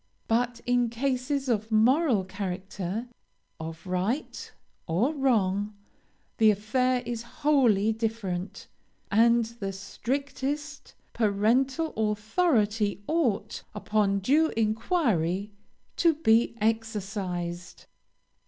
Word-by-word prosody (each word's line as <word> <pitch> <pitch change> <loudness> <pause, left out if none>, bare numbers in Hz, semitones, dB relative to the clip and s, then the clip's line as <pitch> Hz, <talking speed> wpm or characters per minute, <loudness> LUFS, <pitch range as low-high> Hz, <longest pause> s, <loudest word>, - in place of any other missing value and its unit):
But 240 +1 0
in 245 -1 +2
cases 265 +3 -1
of 220 -2 -1
moral 240 - +4
character, 190 +2 -4 0.5
of 160 +2 -7
right 190 +10 -2 0.4
or 205 - +1
wrong, 210 -7 +1 0.6
the 220 -1 +6
affair 250 +5 +1
is 235 -1 -3 0.2
wholly 225 -8 +4
different, 215 -5 -3 0.5
and 230 +2 +4
the 220 -4 -5
strictest 280 +8 -4 0.2
parental 240 +9 +1 0.2
authority 210 - +1
ought, 240 -10 0
upon 205 -1 +1
due 295 +10 +4
inquiry, 215 - 0 0.5
to 335 -2 +4
be 230 -6 +3
exercised. 195 -6 -3
225 Hz, 90 wpm, -27 LUFS, 200-255 Hz, 0.6 s, the